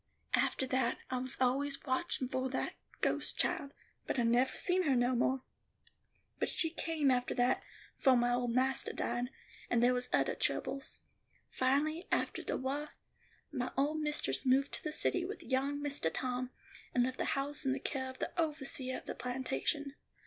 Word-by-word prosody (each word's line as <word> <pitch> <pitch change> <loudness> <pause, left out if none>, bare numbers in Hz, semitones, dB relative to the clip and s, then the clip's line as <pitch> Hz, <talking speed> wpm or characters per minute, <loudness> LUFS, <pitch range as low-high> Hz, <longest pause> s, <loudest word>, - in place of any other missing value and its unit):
"Aftah 265 - +2
that, 255 -2 +2
I 255 - 0
was 255 +1 -1
always 275 +2 +1
watchin' 260 0 0
for 260 +1 -1
that 260 - -2 0.3
ghost - - +1
child, 280 -1 0 0.4
but - - -1
I 240 - +3
nevah 240 +3 +3
seen 370 0 +5
her 285 -7 +3
no 245 +1 +3
more. 260 +2 +1 1.0
But - - +1
she 325 - +3
came 320 -4 +1
after 250 0 +1
that, 245 0 +2 0.4
fo' 265 -3 +6
my 240 0 +3
old 245 0 +1
mastah 260 +2 +1
died; 240 +1 -1 0.4
and 240 -1 +3
there 250 +1 +5
was 250 0 -1
othah - - +3
troubles. 275 +1 -1 0.5
Finally, 295 +6 +1
aftah - - 0
the - - 0
wah, 280 +3 -2 0.6
my 255 -4 -2
old 295 +3 +2
mistress 300 0 0
moved 270 +1 +3
to - - -6
the 305 - -2
city 360 +3 +1
with 395 +4 -5
young 275 +2 0
Mistah 285 - -1
Tom, 250 +5 -2 0.5
and 245 - +5
left 255 +1 -2
the - - +1
house 285 +2 -1
in 270 - +1
the 270 - 0
care 260 -1 -3
of 260 - -9
the - - -3
overseeah 275 -4 -2
of - - -11
the - - -4
plantation. 265 +3 -2
265 Hz, 180 wpm, -34 LUFS, 250-285 Hz, 1.0 s, fo